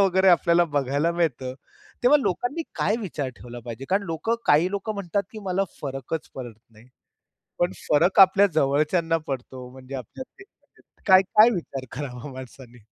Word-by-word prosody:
वगैरे 190 Hz, -1 st, +4 dB
आपल्याला 175 Hz, -1 st, +4 dB
बघायला 145 Hz, +4 st, +1 dB
मिळतं. 135 Hz, -7 st, -1 dB, 0.5 s
तेव्हा 270 Hz, +5 st, +6 dB
लोकांनी 245 Hz, -, -2 dB
काय 215 Hz, -, +1 dB
विचार 155 Hz, -9 st, -4 dB
ठेवला 120 Hz, 0 st, -10 dB
पाहिजे? 120 Hz, +2 st, -7 dB
कारण 195 Hz, +2 st, +2 dB
लोकं, 165 Hz, +8 st, -1 dB
काही 160 Hz, +5 st, +4 dB
लोकं 200 Hz, +2 st, -3 dB
म्हणतात 200 Hz, 0 st, -2 dB
की 220 Hz, -, -9 dB
मला 190 Hz, +1 st, 0 dB, 0.2 s
फरकच 135 Hz, +3 st, -5 dB
पडत 120 Hz, -4 st, -7 dB, 0.2 s
नाही. 110 Hz, +2 st, -19 dB, 0.7 s
पण 175 Hz, +2 st, +1 dB, 0.2 s
फरक 155 Hz, +5 st, +3 dB
आपल्या 195 Hz, +1 st, +7 dB
जवळच्यांना 155 Hz, +3 st, +2 dB
पडतो 130 Hz, -2 st, -6 dB
म्हणजे 130 Hz, +1 st, -11 dB
आपल्यातले 260 Hz, -, -10 dB, 0.6 s
काय-काय 195 Hz, +4 st, +6 dB
विचार 150 Hz, -, -4 dB
करावा 135 Hz, -2 st, -6 dB
माणसानी? 130 Hz, -1 st, -11 dB
165 Hz, 145 wpm, -24 LUFS, 130-190 Hz, 0.7 s, आपल्या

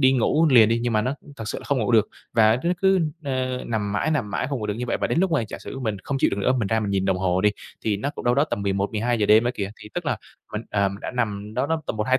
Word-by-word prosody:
đi 130 Hz, -1 st, +5 dB
ngủ 150 Hz, +6 st, +3 dB
liền 115 Hz, -4 st, +7 dB
đi, 115 Hz, +1 st, +2 dB
nhưng 120 Hz, -1 st, 0 dB
mà 105 Hz, -1 st, +2 dB
nó 130 Hz, +4 st, -1 dB, 0.2 s
thật 110 Hz, -, -6 dB
sự -, -, -3 dB
là -, -, -13 dB
không 140 Hz, -2 st, 0 dB
ngủ 115 Hz, +1 st, 0 dB
được, 110 Hz, -2 st, +4 dB, 0.2 s
và 110 Hz, 0 st, +5 dB
nó 175 Hz, -, +2 dB
cứ, 190 Hz, -1 st, +4 dB, 0.2 s
ơ, 130 Hz, -2 st, -2 dB
nằm 105 Hz, -3 st, -2 dB
mãi, 105 Hz, +9 st, 0 dB
nằm 130 Hz, -10 st, 0 dB
mãi 100 Hz, -, -1 dB
không 140 Hz, -3 st, -2 dB
ngủ 105 Hz, -, -3 dB
được 105 Hz, -, -1 dB
như 125 Hz, +2 st, -4 dB
vậy, -, -, 0 dB
và -, -, -1 dB
đến -, -, 0 dB
lúc 190 Hz, -1 st, +2 dB
mà 155 Hz, -6 st, +2 dB
giả -, -, -6 dB
sử 135 Hz, -, -8 dB
mình 110 Hz, -5 st, -2 dB
không 135 Hz, -1 st, -2 dB
chịu -, -, +3 dB
được -, -, -2 dB
nữa, 130 Hz, -, +3 dB
mình 110 Hz, -, 0 dB
ra 110 Hz, +1 st, +1 dB
mình 100 Hz, -2 st, -2 dB
nhìn 95 Hz, -1 st, +1 dB
đồng 95 Hz, -1 st, +1 dB
hồ 95 Hz, -1 st, +1 dB
đi, 105 Hz, -, +4 dB, 0.3 s
thì 105 Hz, -2 st, +1 dB
nó 140 Hz, +8 st, -2 dB
cũng -, -, -7 dB
đâu 120 Hz, 0 st, +3 dB
đó 140 Hz, -, +3 dB
tầm 105 Hz, -9 st, -3 dB
11:00-12:00 105 Hz, +3 st, 0 dB
đêm 110 Hz, +3 st, +6 dB
á 120 Hz, -, +2 dB
kìa. 100 Hz, -3 st, -3 dB
Thì -, -, -10 dB
tức -, -, -3 dB
là -, -, +1 dB, 0.4 s
mình 105 Hz, +1 st, -3 dB
ờ, 100 Hz, -1 st, +2 dB
mình 100 Hz, +1 st, -8 dB
đã -, -, -4 dB
nằm 105 Hz, -4 st, -3 dB
đâu 130 Hz, +3 st, 0 dB
đó 160 Hz, +1 st, -1 dB
tầm -, -, -3 dB
1-2 130 Hz, +5 st, +2 dB
115 Hz, 325 wpm, -24 LUFS, 105-130 Hz, 0.4 s, liền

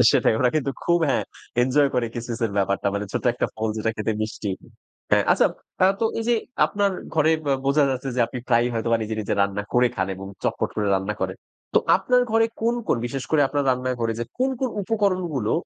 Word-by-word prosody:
এ -, -, +8 dB
সেটাই -, -, +3 dB
ওরা 125 Hz, -, +3 dB
কিন্তু 140 Hz, -2 st, 0 dB
খুব 170 Hz, 0 st, +3 dB
হ্যাঁ 135 Hz, -, +2 dB, 0.4 s
এনজয় 140 Hz, +3 st, +3 dB
করে 125 Hz, -2 st, +1 dB
কিসমিসের 115 Hz, -2 st, -3 dB
ব্যাপারটা। 100 Hz, 0 st, 0 dB
মানে 100 Hz, 0 st, -2 dB
ছোট্ট -, -, -2 dB
একটা 120 Hz, -, -1 dB
ফল 110 Hz, 0 st, -1 dB
যেটা 110 Hz, +1 st, 0 dB
খেতে 110 Hz, +1 st, -1 dB
মিষ্টি। 110 Hz, -1 st, -4 dB, 0.6 s
হ্যাঁ -, -, +4 dB
আচ্ছা -, -, +4 dB, 0.4 s
আ -, -, +7 dB
তো 230 Hz, -, +2 dB, 0.2 s
এইযে 235 Hz, +1 st, +2 dB, 0.3 s
আপনার 200 Hz, -1 st, +1 dB, 0.2 s
ঘরে 155 Hz, 0 st, +4 dB, 0.2 s
বা 140 Hz, -, +3 dB
বোঝা 140 Hz, +1 st, +4 dB
যাচ্ছে 130 Hz, +1 st, -3 dB
যে 125 Hz, -, +2 dB
আপনি 125 Hz, -, -6 dB
প্রায়ই 120 Hz, 0 st, +3 dB
হয়তোবা 115 Hz, +1 st, +1 dB
নিজে, 110 Hz, +1 st, -3 dB
নিজে 105 Hz, -, -1 dB
রান্না 100 Hz, +1 st, -1 dB
করে 125 Hz, 0 st, +4 dB
খান 95 Hz, 0 st, 0 dB
এবং 95 Hz, +1 st, -8 dB, 0.2 s
চটপট -, -, 0 dB
করে 105 Hz, -1 st, 0 dB
রান্না 95 Hz, +2 st, -1 dB
করেন। 95 Hz, 0 st, -2 dB, 0.4 s
তো -, -, +7 dB, 0.2 s
আপনার 250 Hz, +6 st, +2 dB
ঘরে 225 Hz, 0 st, +4 dB, 0.2 s
কোন, 235 Hz, +1 st, +2 dB
কোন -, -, +3 dB
বিশেষ 135 Hz, +2 st, -4 dB
করে 155 Hz, -2 st, +3 dB
আপনার 145 Hz, 0 st, 0 dB
রান্না 130 Hz, 0 st, -1 dB
ঘরে 115 Hz, -1 st, +1 dB
যে 120 Hz, -, -2 dB
কোন, 260 Hz, +1 st, +2 dB
কোন 260 Hz, -, +1 dB
উপকরণগুলো 185 Hz, -, 0 dB
125 Hz, 210 wpm, -24 LUFS, 110-160 Hz, 0.6 s, এ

